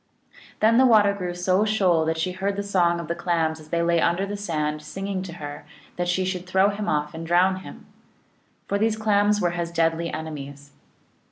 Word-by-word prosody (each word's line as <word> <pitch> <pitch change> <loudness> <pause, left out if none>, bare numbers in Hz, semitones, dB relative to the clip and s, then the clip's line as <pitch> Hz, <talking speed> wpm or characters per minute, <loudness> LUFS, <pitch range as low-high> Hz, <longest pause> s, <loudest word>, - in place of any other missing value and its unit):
Then 225 +3 +5
the 260 - +6
water 210 -4 +5
grew 180 -3 -4
so 185 +3 +2
shoal 190 -7 +2
that 160 0 -1
she 180 +3 -1
heard 195 +2 -2
the 200 - -3
song 175 -4 +1
of 170 - -6
the 170 - -1
Clams 165 -2 -1
as 155 0 -15
they 170 +1 0
lay 170 -1 +2
under 180 +3 +1
the 205 +1 -5
sand, 155 -6 -2
singing 195 +4 -4
to 185 -2 -7
her 145 -4 -8 0.3
that 175 0 -2
she 185 +1 0
should 185 -1 -4
throw 190 +2 +3
him 205 +1 -3
off 150 0 -1
and 165 +1 -6
drown 185 +2 +3
him. 190 - -11 0.8
For 200 - -1
these 220 0 +1
Clams 210 -1 +2
were 175 -3 +1
his 170 -1 -3
deadly 165 0 0
enemies. 145 -2 -7
175 Hz, 205 wpm, -24 LUFS, 165-200 Hz, 0.8 s, the